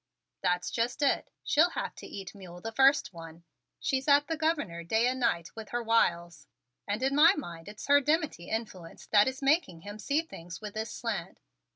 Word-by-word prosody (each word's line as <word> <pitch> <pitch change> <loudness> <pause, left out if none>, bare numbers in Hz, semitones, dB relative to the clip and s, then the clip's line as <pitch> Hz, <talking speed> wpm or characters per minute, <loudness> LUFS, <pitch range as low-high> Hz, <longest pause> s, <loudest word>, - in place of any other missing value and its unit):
"That's 180 -1 0
just 240 +5 -1
it; 280 - +1
she'll 325 +4 +4
have - - -4
to - - -9
eat 195 -2 -8
mule 180 -3 -11
the 225 +5 -5
first 270 -2 +4
one. 165 0 -11 0.4
She's 265 0 -1
at 285 0 +5
the 325 - -2
Governor 295 - -1
day 220 +7 +2
and 255 +1 0
night 170 -9 0
with 220 -1 -8
her 240 0 -2
wiles, 170 -9 +1 0.4
and 210 +5 -2
in 270 +1 +1
my 330 +6 +7
mind 170 - -7
it's 210 - -9
her 285 0 +5
dimity 300 - -1
influence 195 -7 -5
that 205 +1 +4
is 260 +1 -4
making 275 - +2
him 205 +4 -9
see 285 +8 0
things 170 - -10
with 210 -1 -7
this 220 +1 -4
slant. - - -4
225 Hz, 195 wpm, -29 LUFS, 175-280 Hz, 0.4 s, my